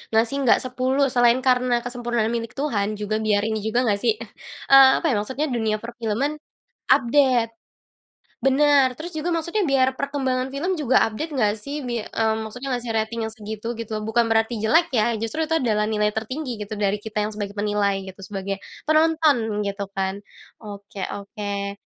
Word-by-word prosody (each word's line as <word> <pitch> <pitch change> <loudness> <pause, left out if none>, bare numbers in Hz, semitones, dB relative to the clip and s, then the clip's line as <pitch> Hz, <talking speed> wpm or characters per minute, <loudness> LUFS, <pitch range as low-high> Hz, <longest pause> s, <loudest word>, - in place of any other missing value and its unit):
ngasih 225 +4 +3
enggak - - +6
10, 255 +2 +1
selain 245 0 +4
karena 250 -2 +2
kesempurnaan 240 -2 -1
milik 230 0 -4
Tuhan, 215 -8 -1
juga 210 +1 -2
biar 210 -2 +1
ini 220 0 -1
juga 220 +4 0
enggak 205 -4 +1
sih 445 - +4
eh, - - -8 0.5
eee, 270 -1 +10
apa - - -2
ya - - +1
maksudnya 260 +8 -2
dunia 220 -3 0
per-film-an, 240 +5 -2 0.5
update, 255 -3 +3 0.9
Bener. 275 -1 +4
Terus, 315 +5 -8
juga 340 +3 -1
maksudnya 340 +5 0
biar 265 -3 +2
perkembangan 265 -2 -2
film 350 +7 -1
juga 275 -5 +3
update 305 +9 -5
enggak 215 -7 +2
sih, 290 +1 -4
bi 240 -4 -3
mmm, 220 0 -1
maksudnya 250 +5 -7
ngasih 240 -1 -4
rating 225 +1 -1
yang 220 - -4
segitu, 220 +1 -6
gitu. 220 -2 -5
Bukan 230 +1 +1
berarti 225 0 +1
jelek 325 +10 +3
ya, 235 -1 +2
justru 225 +9 -2
itu 325 - +2
adalah 215 -7 +1
nilai 210 -1 +1
tertinggi, 240 +2 -4
gitu 210 +1 -5
dari 205 0 0
kita 210 -1 -2
yang 215 - -3
sebagai 205 -1 -5
penilai 205 -1 0
gitu, 190 +1 -11
sebagai 195 0 -5 0.2
penonton, 310 -9 +2
gitu 200 0 -4
kan. 195 +1 -2 0.4
Oke 200 -2 -9 0.2
oke. 200 -1 -5
230 Hz, 175 wpm, -23 LUFS, 210-265 Hz, 0.9 s, eee